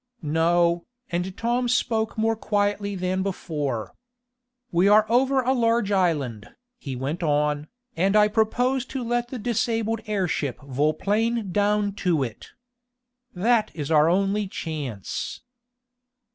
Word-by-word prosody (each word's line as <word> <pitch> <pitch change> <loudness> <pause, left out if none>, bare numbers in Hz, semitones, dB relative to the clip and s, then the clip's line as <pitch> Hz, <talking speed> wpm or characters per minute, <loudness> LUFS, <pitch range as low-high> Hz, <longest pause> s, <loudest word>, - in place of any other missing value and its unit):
"No," 170 +2 +2 0.2
and 180 +2 -2
Tom 240 +2 0
spoke 225 -3 0
more 225 +1 +2
quietly 205 -1 -1
than 185 0 -1
before. 150 - -3 0.8
"We 175 +3 +3
are 210 +1 +6
over 260 +4 +3
a 255 +1 +1
large 230 -4 +1
island." 145 - 0 0.3
he 135 - -5
went 140 +7 -3
on, 150 -1 +1 0.3
"and 190 +5 +2
I 210 0 +6
propose 245 +4 +1
to 265 -2 -4
let 240 +1 -1
the 255 - -6
disabled 225 -1 -1
airship 180 - -1
vol 140 +3 0
plane 220 0 0
down 205 +1 +1
to 165 -6 +2
it. 115 -4 -7 0.9
That 215 +3 +2
is 150 -1 -4
our 155 0 +5
only 195 +3 +1
chance." 145 - -5
195 Hz, 130 wpm, -24 LUFS, 160-225 Hz, 0.9 s, are